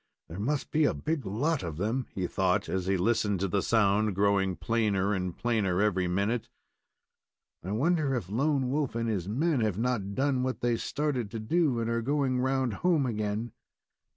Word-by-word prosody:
"There 85 +4 -7
must 140 +7 -2
be 155 0 +3
a - - +1
big 155 -3 -2
lot 140 +11 0
of 80 -4 -5
them," 115 +7 -1
he 95 - -3
thought, 95 +3 0
as 95 -1 -2
he 95 0 +2
listened 105 0 +1
to 100 - +1
the 100 +1 0
sound 105 -1 +2
growing 100 -1 +2
plainer 105 -3 0
and 90 -2 -3
plainer 105 -7 0
every 95 -3 +2
minute. 105 +6 -1 1.1
"I 95 - -4
wonder 145 +2 +1
if 115 -8 -3
Lone 135 +4 0
Wolf 140 -5 -1
and 115 0 -1
his 100 -4 -2
men 145 +6 +1
have 110 -4 0
not 110 -4 -1
done 135 -1 +1
what 130 0 -2
they 120 -1 +2
started 135 -3 -2
to 115 +2 -5
do 135 +2 +1
and 115 - -1
are 115 0 0
going 135 0 0
round 130 -2 0
home 170 -6 +3
again?" 110 0 -2
115 Hz, 185 wpm, -29 LUFS, 100-130 Hz, 1.1 s, be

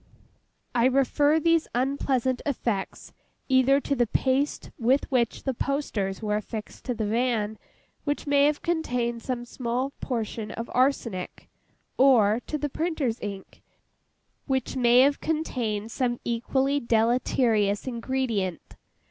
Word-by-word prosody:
I 240 -1 +3
refer 285 +4 +3
these 330 0 +2
unpleasant 260 -1 0
effects, 230 -8 -3 0.4
either 265 +1 +5
to 280 - -1
the 240 -2 +2
paste 265 +5 0
with 255 +4 +2
which 240 -3 0
the 265 - -1
posters 230 -8 -2
were 210 -1 +1
affixed 215 0 -7
to 250 - -2
the 220 - -2
van: 220 -1 0 0.4
which 290 -1 -2
may 285 -1 +4
have 295 0 0
contained 245 -9 -1
some 240 0 -3
small 250 +2 -2
portion 225 -3 -3
of 230 +2 -6
arsenic; 245 -8 -1 0.5
or, 235 -5 +5
to 305 - -2
the 295 0 -2
printer's 295 -6 -2
ink, 200 -2 -7 0.9
which 265 -2 -1
may 245 -1 +5
have 280 +1 +3
contained 235 -9 -2
some 240 -1 -1
equally 265 +4 0
deleterious 230 -3 +2
ingredient. 235 -7 -3
250 Hz, 125 wpm, -26 LUFS, 225-275 Hz, 0.9 s, either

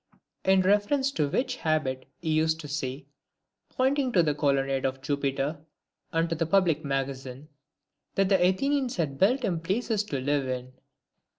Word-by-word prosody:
In 190 0 +4
reference 210 +9 +2
to 150 - 0
which 255 - -1
habit 145 -5 -1 0.2
he 160 - 0
used 160 +1 +2
to 150 - -8
say, 135 -2 -4 0.6
pointing 265 0 +1
to 175 - +5
the 150 -2 +1
Colonnade 135 -2 +1
of 135 0 -1
Jupiter, 140 +1 -1 0.5
and 165 +1 +1
to 165 - -2
the 165 0 -1
Public 170 -4 +2
Magazine, 135 0 -4 0.3
" - - -53
that 195 0 +3
the 190 -3 +4
Athenians 260 +8 +1
had 145 -6 -2
built 245 +7 +3
him 175 -7 0
places 210 +5 -1
to 140 -9 -3
live 140 0 0
in." 130 0 -4
160 Hz, 165 wpm, -27 LUFS, 140-195 Hz, 0.6 s, to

